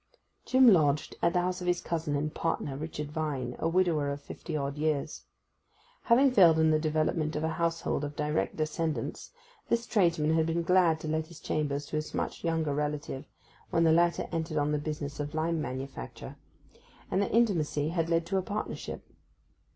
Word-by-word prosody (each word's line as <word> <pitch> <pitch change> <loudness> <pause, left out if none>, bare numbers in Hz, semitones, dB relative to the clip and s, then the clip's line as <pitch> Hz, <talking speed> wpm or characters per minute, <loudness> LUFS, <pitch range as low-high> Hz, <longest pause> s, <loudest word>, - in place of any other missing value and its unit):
Jim 260 0 +5
lodged 150 -8 +4
at 170 0 +2
the 180 - +3
house 180 +1 -2
of 180 - -4
his 175 0 +2
cousin 160 -4 -2
and 150 +1 -2
partner, 155 -4 -2
Richard 150 0 -5
Vine, 145 -6 -3
a - - 0
widower 165 -5 +2
of 140 - -4
fifty 155 +2 -6
odd 140 -1 -2
years. 150 -2 -2 0.8
Having 260 +3 +5
failed 175 -9 +6
in 160 0 +4
the 155 - +3
development 155 0 0
of 150 - -2
a 160 - +1
household 165 -2 -1
of 145 0 -4
direct 150 +1 -1
descendants 155 -4 -2 0.4
this 235 0 +1
tradesman 170 -8 +2
had 160 0 +2
been 165 +1 0
glad 175 -2 +4
to - - -5
let 155 0 -1
his 170 -1 -13
chambers 145 -1 -2
to 155 - -3
his 155 0 -4
much - - -3
younger 160 -3 0
relative, 150 -1 -3 0.4
when 165 - +2
the 165 - +5
latter 170 +1 +2
entered 160 -1 -2
on 145 0 +1
the 150 - +1
business 150 -1 -5
of 145 +1 -4
lime 160 0 0
manufacture; 130 - -6 0.8
and 190 - +2
their 200 - 0
intimacy 165 -10 +1
had 165 -1 -1
led 165 0 +2
to 190 +3 -1
a - - +2
partnership. 205 +3 -5
160 Hz, 185 wpm, -29 LUFS, 150-170 Hz, 0.8 s, failed